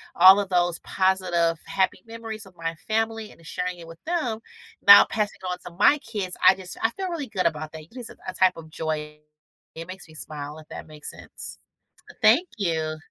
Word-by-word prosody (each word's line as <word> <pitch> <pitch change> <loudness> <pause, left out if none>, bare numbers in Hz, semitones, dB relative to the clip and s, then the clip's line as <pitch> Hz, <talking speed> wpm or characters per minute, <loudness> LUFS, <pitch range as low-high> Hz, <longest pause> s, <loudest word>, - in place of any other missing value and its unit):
all 190 +3 +9
of 200 - -6
those 175 -2 +2
positive, 180 -3 +1
happy 190 -1 0
memories 225 -2 -7
of 190 - -16
my 165 0 -3
family 225 0 -1
and 165 - -18
sharing 180 0 -3
it 165 - -11
with 165 0 -12
them, 305 -10 -1 0.5
now 200 0 +11
passing 210 -2 -2
on 180 - -2
to 180 - -7
my 290 +8 +6
kids, 205 -7 -4
I 185 - +9
just 185 -1 -9
I 225 - +3
feel 380 +8 -4
really 325 -6 -4
good 190 -4 -1
about 155 -1 -4
that. 160 -1 -8
It 170 +10 -21
is 245 -3 -7
a - - -13
a - - -3
type 185 -1 +3
of 160 -1 -10
joy. 150 -1 -4 0.6
It 165 +1 -7
makes 185 0 -9
me 155 - -16
smile, 150 0 -7
if 155 - -15
that - - -8
makes 150 -1 -8
sense. - - -9 0.7
Thank 360 - +5
you. 160 -5 -1
185 Hz, 205 wpm, -25 LUFS, 165-215 Hz, 0.7 s, now